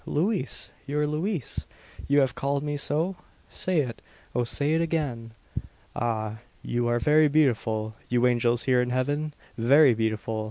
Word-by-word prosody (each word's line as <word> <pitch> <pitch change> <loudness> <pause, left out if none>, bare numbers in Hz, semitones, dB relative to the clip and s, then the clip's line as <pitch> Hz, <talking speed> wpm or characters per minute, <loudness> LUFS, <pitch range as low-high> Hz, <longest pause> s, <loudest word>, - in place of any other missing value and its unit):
Louise! 185 +6 -1 0.2
Your 150 +1 0
Louise! 155 - -2 0.4
You 140 +1 +4
have 130 -2 +1
called 140 -3 -1
me 145 0 -2
so? 160 +6 0 0.3
Say 180 -4 0
it 120 -5 -5 0.3
O 125 - +1
say 145 +5 0
it 165 - +2
again!" 145 -9 -2 0.6
"Ah! 110 -2 -2 0.2
you 120 0 -1
are 120 0 +2
very 150 +5 +4
beautiful, 115 -7 +1 0.2
you 125 0 +2
angels 120 -1 +2
here 125 -2 +3
in 125 - -1
heaven! 145 +4 -1 0.2
Very 135 +3 +6
beautiful. 110 0 -1
135 Hz, 150 wpm, -26 LUFS, 120-150 Hz, 0.6 s, Very